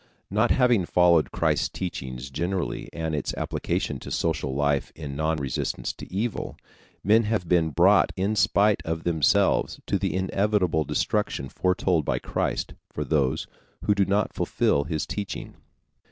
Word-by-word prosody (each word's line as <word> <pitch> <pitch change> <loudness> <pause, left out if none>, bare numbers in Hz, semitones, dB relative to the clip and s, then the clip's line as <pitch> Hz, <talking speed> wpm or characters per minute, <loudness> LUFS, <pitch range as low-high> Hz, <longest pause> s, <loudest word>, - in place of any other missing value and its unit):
Not 110 +4 +2
having 120 -8 +3
followed 85 -3 +4
Christ's - - +1
teaching 65 -9 -5
generally 85 +9 -3
and 80 -1 -3
its 75 -3 -2
application - - -2
to - - -9
social 75 -5 -1
life 70 -2 0
in 75 -3 -6
non 80 +2 0
resistance 70 -3 -2
to - - -11
evil, 105 +4 -3 0.5
men 110 +4 +4
have 105 -5 -1
been 85 -2 +3
brought 75 - +4
in 100 +3 0
spite 100 +1 +3
of 80 0 -3
themselves 80 -4 +2
to - - 0
the - - -1
inevitable 95 -4 +1
destruction 65 0 -1
foretold 90 -3 +1
by - - 0
Christ - - -2 0.2
for - - -3
those 70 -5 0 0.4
who 105 - +4
do 100 -1 +2
not 100 +2 0
fulfill 70 0 +1
his 80 -1 -2
teaching. 100 -2 -5
85 Hz, 150 wpm, -25 LUFS, 75-100 Hz, 0.5 s, followed